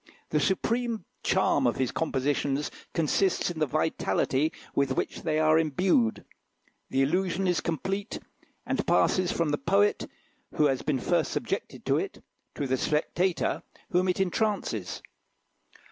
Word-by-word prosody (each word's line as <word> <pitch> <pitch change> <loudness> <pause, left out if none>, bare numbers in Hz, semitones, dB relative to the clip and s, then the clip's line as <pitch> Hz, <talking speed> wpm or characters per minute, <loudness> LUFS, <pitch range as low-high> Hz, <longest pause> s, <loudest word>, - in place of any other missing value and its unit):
The 150 - +3
supreme 225 +4 0 0.2
charm 145 -8 +2
of 120 - +1
his 130 -3 0
compositions 145 -1 -1 0.2
consists 175 +3 +1
in 165 - -7
the 155 - +2
vitality 155 0 0 0.2
with 140 -1 +1
which - - -3
they 155 -2 0
are 155 0 +4
imbued. 155 - +1 0.6
The 135 - +2
illusion 180 +5 0
is 180 -2 +1
complete, 195 +5 -3 0.5
and - - -1
passes 185 -2 +3
from 165 -2 0
the 145 - 0
poet 200 +7 +2 0.5
who 150 - +4
has 135 -3 +2
been 145 -4 0
first - - +1
subjected - - -3
to - - +2
it, - - -6 0.3
to 145 - -2
the 130 0 +1
spectator, 165 +5 0 0.3
whom 180 +1 +2
it 180 - 0
entrances. 190 - -1
160 Hz, 140 wpm, -28 LUFS, 140-185 Hz, 0.6 s, are